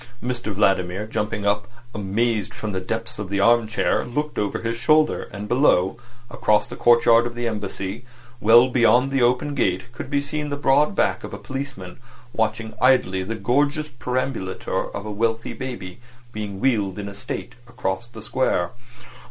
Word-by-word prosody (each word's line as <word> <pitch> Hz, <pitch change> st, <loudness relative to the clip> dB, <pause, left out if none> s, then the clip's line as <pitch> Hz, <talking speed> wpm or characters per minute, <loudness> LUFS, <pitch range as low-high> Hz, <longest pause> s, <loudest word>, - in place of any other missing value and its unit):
Mr 120 Hz, -2 st, -3 dB
Vladimir, 95 Hz, -1 st, +1 dB
jumping 105 Hz, -1 st, -3 dB
up 105 Hz, 0 st, +1 dB, 0.3 s
amazed 105 Hz, +1 st, -1 dB
from 110 Hz, -, -4 dB
the 95 Hz, -, -2 dB
depths 115 Hz, +3 st, -4 dB
of 105 Hz, -3 st, -5 dB
the 100 Hz, 0 st, -1 dB
arm 115 Hz, +2 st, +4 dB
chair, 110 Hz, -, +1 dB
looked 150 Hz, +5 st, -3 dB
over 105 Hz, -1 st, -1 dB
his 115 Hz, 0 st, -1 dB
shoulder; 155 Hz, +6 st, +2 dB
and 105 Hz, +1 st, -6 dB
below, 105 Hz, -7 st, +3 dB, 0.4 s
across 105 Hz, -1 st, +2 dB
the -, -, -8 dB
courtyard 120 Hz, 0 st, +5 dB
of 120 Hz, -, -8 dB
the 120 Hz, 0 st, -2 dB
Embassy, 105 Hz, 0 st, -4 dB, 0.4 s
well 120 Hz, +3 st, +7 dB
beyond 125 Hz, +1 st, +4 dB
the 135 Hz, -1 st, +1 dB
open 125 Hz, +4 st, +2 dB
gate, 95 Hz, -5 st, 0 dB
could 130 Hz, -, -7 dB
be 140 Hz, -1 st, +1 dB
seen 150 Hz, +1 st, -3 dB
the 145 Hz, -, -2 dB
broad 145 Hz, +6 st, +3 dB
back -, -, +1 dB
of -, -, -6 dB
a -, -, -7 dB
policeman 125 Hz, -5 st, -7 dB, 0.3 s
watching 110 Hz, 0 st, -1 dB
idly 125 Hz, -8 st, +4 dB
the 105 Hz, +5 st, -3 dB
gorgeous 145 Hz, +8 st, +1 dB
perambulator 125 Hz, -6 st, -3 dB
of 100 Hz, -, -6 dB
a 105 Hz, -, -4 dB
wealthy 115 Hz, +2 st, -1 dB
baby 120 Hz, -7 st, -7 dB, 0.3 s
being 105 Hz, -2 st, -5 dB
wheeled 105 Hz, -6 st, +1 dB
in 100 Hz, -1 st, -5 dB
state 100 Hz, +4 st, -6 dB
across 115 Hz, -2 st, -3 dB
the 115 Hz, -3 st, -11 dB
Square. 110 Hz, -8 st, 0 dB
115 Hz, 170 wpm, -23 LUFS, 100-125 Hz, 0.4 s, well